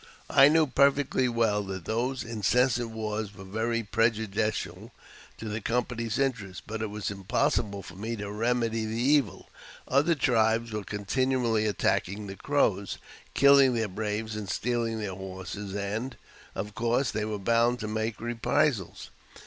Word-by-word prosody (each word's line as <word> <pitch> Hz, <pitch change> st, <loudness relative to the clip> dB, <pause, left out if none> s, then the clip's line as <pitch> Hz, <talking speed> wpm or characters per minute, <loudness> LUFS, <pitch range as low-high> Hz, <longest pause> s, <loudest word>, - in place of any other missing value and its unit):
I 140 Hz, -1 st, +8 dB
knew 160 Hz, +1 st, +4 dB
perfectly 140 Hz, -1 st, +2 dB
well 115 Hz, -3 st, +1 dB
that 95 Hz, -2 st, -6 dB
these 125 Hz, +4 st, -1 dB
incessant 120 Hz, +2 st, +1 dB
wars 110 Hz, -2 st, -4 dB
were 95 Hz, -, -10 dB
very 115 Hz, +4 st, -1 dB
prejudicial 110 Hz, -1 st, -1 dB, 0.5 s
to 110 Hz, -, -7 dB
the 110 Hz, +1 st, -3 dB
company's 115 Hz, -1 st, -1 dB
interest, 115 Hz, -9 st, -2 dB
but 110 Hz, 0 st, -5 dB
it 110 Hz, -, -2 dB
was 105 Hz, -1 st, -4 dB
impossible 100 Hz, +1 st, -1 dB
for^^ 90 Hz, -, -11 dB
me 115 Hz, +3 st, -3 dB
to 100 Hz, -2 st, -5 dB
remedy 115 Hz, +1 st, 0 dB
the 110 Hz, +1 st, -3 dB
evil. 135 Hz, -3 st, +1 dB, 0.4 s
Other 150 Hz, +6 st, +3 dB
tribes 115 Hz, -4 st, +2 dB
were 105 Hz, -1 st, -3 dB
continually 115 Hz, +2 st, 0 dB
attackinMB 100 Hz, +1 st, -1 dB
the 95 Hz, -, -6 dB
Crows, 100 Hz, -8 st, 0 dB, 0.4 s
killing 140 Hz, -2 st, +6 dB
their 110 Hz, -2 st, 0 dB
braves, 105 Hz, +2 st, -3 dB
and 105 Hz, -3 st, -5 dB
stealing 115 Hz, 0 st, -1 dB
their 105 Hz, -3 st, -4 dB
horses, 95 Hz, +1 st, -7 dB
and, 105 Hz, +6 st, -3 dB, 0.4 s
^ -, -, -6 dB
of 105 Hz, +2 st, -4 dB
course, 120 Hz, +4 st, +1 dB
they 110 Hz, 0 st, -2 dB
were 105 Hz, 0 st, -3 dB
bound 115 Hz, +4 st, +2 dB
to 110 Hz, -, -3 dB
make 110 Hz, 0 st, -2 dB
reprisals. 120 Hz, -, -1 dB
110 Hz, 150 wpm, -28 LUFS, 105-120 Hz, 0.5 s, I